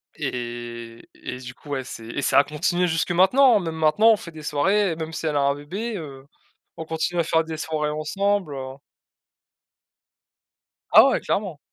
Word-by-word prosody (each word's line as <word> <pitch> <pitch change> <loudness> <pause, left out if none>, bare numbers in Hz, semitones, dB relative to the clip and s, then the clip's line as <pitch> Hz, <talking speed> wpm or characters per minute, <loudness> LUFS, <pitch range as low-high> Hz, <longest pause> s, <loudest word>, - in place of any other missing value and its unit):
Et 120 -1 -6 0.2
et - - -7
et - - -8
du 125 0 -9
coup, 145 - -16
ouais, 135 -2 -2
c'est 115 -3 -9
et 120 +5 -4
ça - - +2
a - - +5
continué 175 +5 0
jusque 165 +1 -1
maintenant, 215 +7 +5
même 165 -3 -4
maintenant 160 +8 +4
on 220 - +3
fait 170 - -10
des 155 -1 -11
soirées, 175 +5 +1
même 160 0 -5
si 160 0 -5
elle 150 -2 0
a - - +3
un 140 0 +2
bébé, 200 +10 -5
heu, 140 -5 -9 0.5
on 160 - -6
continue 165 +2 -2
à 170 - +3
faire 160 0 +2
des 160 -1 -6
soirées 155 -1 -2
ensemble, 180 +3 -1
heu. 130 -1 -6 2.2
Ah - - +9
ouais, - - +1
clairement. 195 -7 -2
160 Hz, 190 wpm, -23 LUFS, 140-180 Hz, 2.2 s, Ah